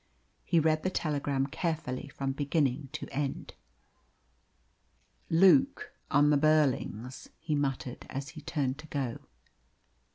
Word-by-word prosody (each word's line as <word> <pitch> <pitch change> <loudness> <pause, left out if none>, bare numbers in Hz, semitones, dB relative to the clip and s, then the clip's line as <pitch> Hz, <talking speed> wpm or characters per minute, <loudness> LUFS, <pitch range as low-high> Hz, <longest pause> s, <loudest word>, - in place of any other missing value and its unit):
He 170 - +3
read 155 0 +2
the 185 - 0
telegram 145 -5 -1
carefully 150 -3 -3
from 135 -1 -3
beginning 140 -1 0
to - - -5
end. 140 0 -3 1.8
"Luke 195 +12 +4 0.2
on 145 -1 +4
the 145 - +5
Burlings!" 140 -5 +1
he 155 - -3
muttered, 135 -3 -2
as 135 +1 -5
he 155 - -10
turned 140 -4 -2
to 155 - -10
go. 135 -6 -3
145 Hz, 120 wpm, -30 LUFS, 135-155 Hz, 1.8 s, the